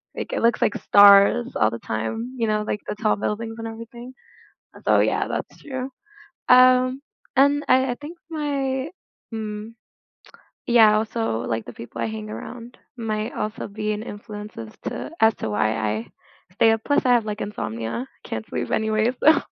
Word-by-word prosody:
like, - - -5
it - - -1
looks 235 0 +3
like - - +2
stars 205 +4 +6
all 110 - +3
the 115 - -5
time, 225 - -4
you 230 -2 0
know, 215 0 +1
like 210 - -2
the - - -3
tall 215 0 +1
buildings 225 +2 -3
and 225 - -4
everything, 230 +2 -9 0.7
so - - +5
yeah, - - +1
that's - - -5
true, 260 -2 -5 0.6
um, 255 +1 +6 0.4
and 285 +2 +4
I 260 0 +4
I - - -2
think 305 +4 -8
my 280 -3 -2 0.4
mm 215 0 -5 1.0
yeah, 220 -3 +6
also 220 - -1
like 110 -1 -2
the - - -8
people 115 0 -8
I 115 - 0
hang 110 -1 -6
around 235 - -8 0.2
might 220 0 -2
also 215 +2 -4
be 215 +1 -3
an 210 +1 -5
influence 210 -1 -8
as 110 -1 -7
to - - -5
as 220 0 +6
to - - -4
why 110 +1 +1
I 110 +1 -2 0.5
stay 225 +3 +4
up, 225 - +1
plus 285 - +2
I 250 - +4
have, 235 -3 +3
like, 210 0 -4
insomnia, 115 - -4 0.2
I - - -10
can't 110 -1 -4
sleep - - -4
anyway, 220 +1 +1
so, 315 +1 +6
220 Hz, 180 wpm, -23 LUFS, 200-245 Hz, 1.0 s, stars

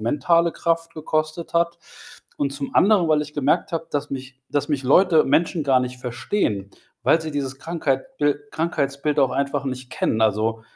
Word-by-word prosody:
mentale 165 +9 +2
Kraft 165 0 -1
gekostet 155 +1 -2
hat. 170 0 +1 0.6
Und 140 -1 0
zum 140 0 -6
anderen, 195 -4 +4
weil 155 -1 +3
ich 150 0 -10
gemerkt 145 +3 +1
habe, 165 0 -2
dass 145 0 -2
mich 130 -1 -7
dass 145 +1 0
mich 140 -3 -1
Leute, 160 +3 +5
Menschen 160 +3 +1
gar 135 -2 +4
nicht 125 0 -4
verstehen, 120 - -2 0.3
weil 165 - +4
sie 160 -1 -5
dieses 135 -2 -3
Krankheitbil 145 - -1
Krankheitsbild 150 -3 -1
auch 135 -2 +3
einfach 140 0 -1
nicht 130 -1 -5
kennen. 110 -2 0
Also, 110 +1 +1
145 Hz, 165 wpm, -22 LUFS, 130-165 Hz, 0.6 s, Leute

